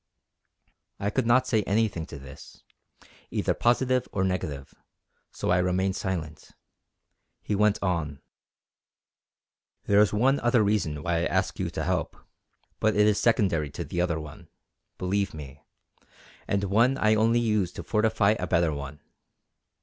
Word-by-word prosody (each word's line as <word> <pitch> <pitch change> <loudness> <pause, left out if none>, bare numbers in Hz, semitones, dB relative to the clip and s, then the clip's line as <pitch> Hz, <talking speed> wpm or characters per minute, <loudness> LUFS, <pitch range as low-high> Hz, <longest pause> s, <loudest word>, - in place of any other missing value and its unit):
I 100 +1 -1
could 130 -1 0
not 130 +2 +4
say 110 -4 +1
anything 100 -5 0
to 75 - -9
this, 65 -1 -13 0.7
either - - 0
positive 125 +1 +1
or 95 - -1
negative, 80 -7 -3 0.6
so - - -3
I 90 - +4
remained 95 +1 0
silent. 85 -6 -5 0.9
He - - -2
went 105 +1 +3
on: 80 -7 -2 1.6
"There 100 0 +4
is 105 - +3
one 130 +6 +2
other 120 -2 +3
reason 90 -8 -1
why 85 0 0
I 85 - 0
ask - - -1
you - - -1
to - - -4
help, - - -2 0.6
but 110 0 +2
it 105 0 +4
is 105 -1 +3
secondary 95 -10 +2
to - - -6
the 85 - -3
other 85 -3 0
one, 75 -2 -10 0.5
believe 100 0 -1
me, 70 -2 -10 0.9
and 100 0 0
one 115 +7 +2
I 110 -3 +3
only 115 +2 +3
use 105 -6 0
to - - -7
fortify 105 -2 +2
a - - -3
better 85 -3 +2
one. 70 0 -7
100 Hz, 150 wpm, -26 LUFS, 85-110 Hz, 1.6 s, not